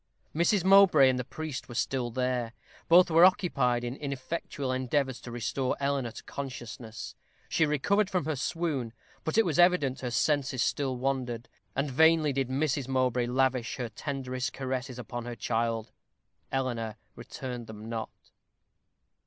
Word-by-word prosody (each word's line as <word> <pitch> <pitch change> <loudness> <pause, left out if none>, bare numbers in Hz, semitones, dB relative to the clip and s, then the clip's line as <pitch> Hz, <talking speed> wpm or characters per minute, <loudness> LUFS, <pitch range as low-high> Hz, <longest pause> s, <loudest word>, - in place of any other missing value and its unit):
Mrs. 175 +3 +3
Mowbray 190 -8 +7
and 125 -1 0
the - - -1
priest 150 +1 -6
were 120 - -8
still 125 0 -1
there. 125 -1 -1 0.3
Both 175 +1 +6
were 165 +2 +6
occupied 140 -10 +3
in 120 +1 -3
ineffectual 140 0 -4
endeavors 130 0 -1
to 120 - -8
restore 120 +3 -2
Eleanor 140 -3 0
to - - -10
consciousness. 120 -4 -7 0.4
She 160 - +2
recovered 195 +8 +2
from 180 -6 0
her 155 -1 -1
swoon; 140 -5 -2 0.3
but 160 - -2
it 225 - +5
was 165 -3 0
evident 170 -7 +4
her 125 - -2
senses 135 -1 +1
still 135 -3 -1
wandered; 125 -2 -2 0.3
and 140 +1 -1
vainly 160 +1 +4
did 135 -1 -1
Mrs. 140 -1 0
Mowbray 125 -2 +1
lavish 130 -1 +1
her 125 -3 -4
tenderest 130 +1 -4
caresses 130 -1 -4
upon 120 0 -6
her 120 0 -5
child. 115 -1 -1 0.6
Eleanor 120 -5 -2 0.2
returned 120 0 -7
them 110 0 -9
not. 115 -1 -4
130 Hz, 150 wpm, -29 LUFS, 120-150 Hz, 0.6 s, Mowbray